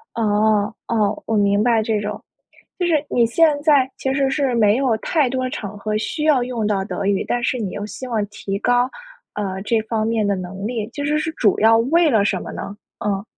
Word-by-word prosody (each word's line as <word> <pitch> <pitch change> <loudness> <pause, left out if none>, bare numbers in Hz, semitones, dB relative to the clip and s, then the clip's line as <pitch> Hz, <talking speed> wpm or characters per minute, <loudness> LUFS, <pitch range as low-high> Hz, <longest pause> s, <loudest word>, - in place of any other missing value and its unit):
哦， 210 -1 +2
哦， 215 -2 0
我 225 - 0
明 200 0 +3
白 230 -2 +3
这 220 -1 0
种。 210 +1 -5 0.6
就 355 - 0
是 310 -4 +2
你 235 -1 +3
现 295 +4 +3
在 285 -4 +4
其 265 - -2
实 270 -1 +1
是 275 -3 0
没 215 -2 +4
有 255 -4 +1
太 290 +4 +1
多 255 0 -2
场 210 -4 -6
合 210 +1 -3
需 300 +7 -3
要 285 -6 +3
用 245 -3 -3
到 200 -2 0
德 195 - -4
语， 195 -1 +1
但 245 - -1
是 250 +1 0
你 210 -5 -3
又 205 - -5
希 255 +4 -8
望 225 -4 -1
提 200 -1 -5
高， 245 +1 +2 0.5
呃， 190 -2 -3
这 225 +2 +1
方 220 0 -2
面 225 -1 0
的 200 -1 +1
能 185 +2 -6
力， 225 -2 -3
就 285 +3 -5
是 300 +1 +1
是 320 +1 -2
主 210 -9 +2
要 225 +1 +6
为 315 +8 +3
了 220 -5 +3
什 - - 0
么 - - -7
呢？ 200 - -7 0.3
嗯。 200 -1 -1
225 Hz, 240 characters per minute, -20 LUFS, 205-260 Hz, 0.6 s, 要